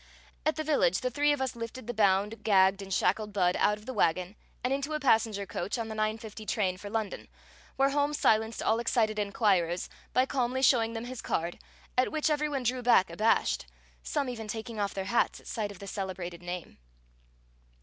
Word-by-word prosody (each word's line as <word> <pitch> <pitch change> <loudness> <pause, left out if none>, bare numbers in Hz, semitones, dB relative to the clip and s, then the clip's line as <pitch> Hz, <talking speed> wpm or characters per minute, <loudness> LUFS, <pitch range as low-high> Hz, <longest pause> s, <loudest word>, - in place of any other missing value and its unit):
At 310 - +2
the 310 - -2
village, 285 - +2
the 255 - -1
three 290 +4 +3
of 290 -2 0
us 260 - -3
lifted 230 +1 -6
the 240 - -4
bound, 205 +1 +2
gagged 195 -1 +4
and 195 0 -8
shackled 210 +3 +1
Budd 180 -3 +2
out 210 - +3
of 210 - -16
the 260 - -5
wagon 185 -1 +1 0.3
and 250 +2 +1
into 280 +3 -2
a 305 - 0
passenger 220 -6 +2
coach 185 +3 -3
on 225 -1 -3
the 220 - -5
9:50 215 0 -3
train 185 -4 0
for 205 +2 -8
London, 220 -1 -3 0.5
where 275 +1 +3
Holmes 290 +1 +1
silenced 220 +1 +2
all 225 +1 +2
excited 220 -2 +1
inquirers 195 -4 +1 0.2
by 255 - +3
calmly 260 -1 -1
showing 230 -3 +4
them 225 +1 -4
his 250 -1 -6
card, 170 +1 -2 0.4
at 255 - +2
which 310 0 +1
every 300 0 +1
one 275 -3 -2
drew 250 +1 0
back 215 -7 +4
abashed, 215 +6 +1 0.3
some 290 -3 -1
even 225 -3 -5
taking 220 +1 -5
off 200 -1 -1
their 195 -1 -3
hats 235 +5 +1
at - - -20
sight 215 -2 -3
of 200 - -11
the 200 - -9
celebrated 185 -3 -5
name. 175 - -6
220 Hz, 200 wpm, -29 LUFS, 195-250 Hz, 0.5 s, gagged